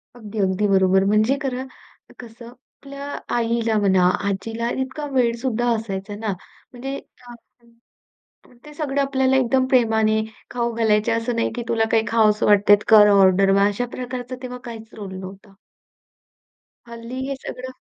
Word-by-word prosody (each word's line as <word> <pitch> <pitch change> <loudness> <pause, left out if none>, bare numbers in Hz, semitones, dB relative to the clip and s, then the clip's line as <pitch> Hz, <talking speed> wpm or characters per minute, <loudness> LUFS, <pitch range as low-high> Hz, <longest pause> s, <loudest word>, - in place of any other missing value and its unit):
अगदी 220 -2 -8
अगदी 195 +1 +1
बरोबर 190 -1 +3
म्हणजे 215 +7 +2
खरं 260 -1 -3 0.5
कसं, 235 -1 -12
आपल्या 275 +2 -12 0.3
आईला 230 -1 0
म्हणा, 190 -3 +3 0.2
आजीला, 225 +4 -3
इतका 265 +3 -5
वेळ 240 -3 +2
सुद्धा 240 -2 0
असायचा 205 -2 -5
ना, 210 -1 -3 0.4
म्हणजे 270 +3 -6 1.7
ते 300 0 -12
सगळं 285 -2 -2
आपल्याला 265 -1 +1
एकदम 260 0 +2
प्रेमाने 220 -3 +2 0.3
खाऊ 235 -1 -2
घालायचे. 220 0 +1
असं 230 +1 -1
नाही 230 - 0
की 240 - -3
तुला 225 -1 +1
काही 225 -1 +3
खावंस 215 -2 +2
वाटतंय, 205 0 +5
कर 210 -2 +8
ऑर्डर 195 -1 +4
मग 200 +1 +4
अशा 245 +5 -3
प्रकारचा 250 0 -6
तेव्हा 250 0 -6
काहीच 225 -1 -10
रोल 200 -3 -8
नव्हता. 195 +1 -11 1.3
हल्ली 235 +2 -8
हे 275 - -2
सगळं 260 +1 -7
230 Hz, 140 wpm, -21 LUFS, 205-250 Hz, 1.7 s, कर